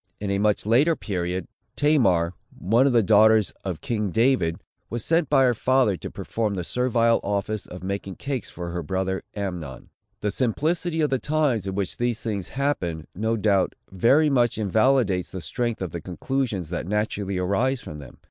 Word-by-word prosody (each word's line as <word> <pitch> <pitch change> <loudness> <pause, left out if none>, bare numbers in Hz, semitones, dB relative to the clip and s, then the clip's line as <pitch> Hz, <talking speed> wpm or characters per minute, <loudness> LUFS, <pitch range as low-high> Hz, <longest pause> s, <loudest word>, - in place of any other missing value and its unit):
In 100 -1 -2
a 100 - 0
much 105 0 +1
later 135 +10 +4
period, 90 - -3 0.3
Tamar, 100 - +3 0.2
one 115 +8 +3
of - - +3
the 115 -2 +4
daughters 110 0 +5
of 90 -5 -4
king 105 -4 -1
David, 110 -6 +2 0.3
was 120 -1 -4
sent 165 0 +2
by 135 -2 +5
her 125 -1 +4
father 125 -3 +2
to - - -7
perform 110 -3 -3
the 90 - -3
servile 115 +2 +2
office 100 +1 -2
of 90 0 -9
making 95 0 -4
cakes 135 -3 -4
for 85 0 -6
her 85 0 -3
brother 95 +3 -2
Amnon. 90 -10 -5 0.3
The 105 - 0
simplicity 160 - 0
of 150 - +1
the 135 - +1
times 145 - 0
in 95 - -3
which 100 -2 -2
these 120 -2 0
things 100 -5 -3
happened, 90 - -2
no 110 +4 -1
doubt, 100 -3 +2 0.2
very 135 - +4
much 120 -5 +2
invalidates 110 -2 +2
the 95 - -6
strength 120 +4 -2
of 90 - -4
the 85 - -5
conclusions 95 - -3
that 90 - -3
naturally 105 -1 -1
arise 100 +9 +1
from 75 - -8
them. 70 - -12
105 Hz, 180 wpm, -24 LUFS, 95-125 Hz, 0.3 s, daughters